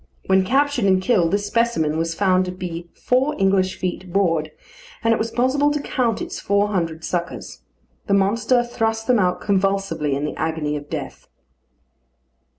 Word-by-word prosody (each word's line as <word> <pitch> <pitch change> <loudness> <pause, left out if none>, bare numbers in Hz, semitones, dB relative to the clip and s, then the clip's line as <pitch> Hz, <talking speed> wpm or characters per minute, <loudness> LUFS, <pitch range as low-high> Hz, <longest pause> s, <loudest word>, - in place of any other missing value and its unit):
When 190 0 +3
captured 270 +2 +1
and 190 -1 +4
killed, 185 -4 +2
this 205 +2 0
specimen 205 -9 +1
was 165 +1 -1
found 185 -1 +2
to 180 - -4
be 175 -2 -6
four 265 +4 +1
English 190 -1 +2
feet 185 0 -4
broad, 165 -5 +1 0.5
and 230 0 +4
it - - -1
was 225 - -1
possible 260 +5 +2
to 295 0 -1
count 245 -6 -1
its - - -6
four 200 +1 +1
hundred 165 -5 -2
suckers. 175 +1 -4 0.5
The 200 - +3
monster 225 +5 +2
thrust 225 -2 -2
them 250 -3 +3
out 180 -2 +1
convulsively 195 -7 0
in 140 +2 -2
the 150 - -4
agony 160 -2 -2
of 145 0 -7
death. - - -6
195 Hz, 165 wpm, -21 LUFS, 170-230 Hz, 0.5 s, and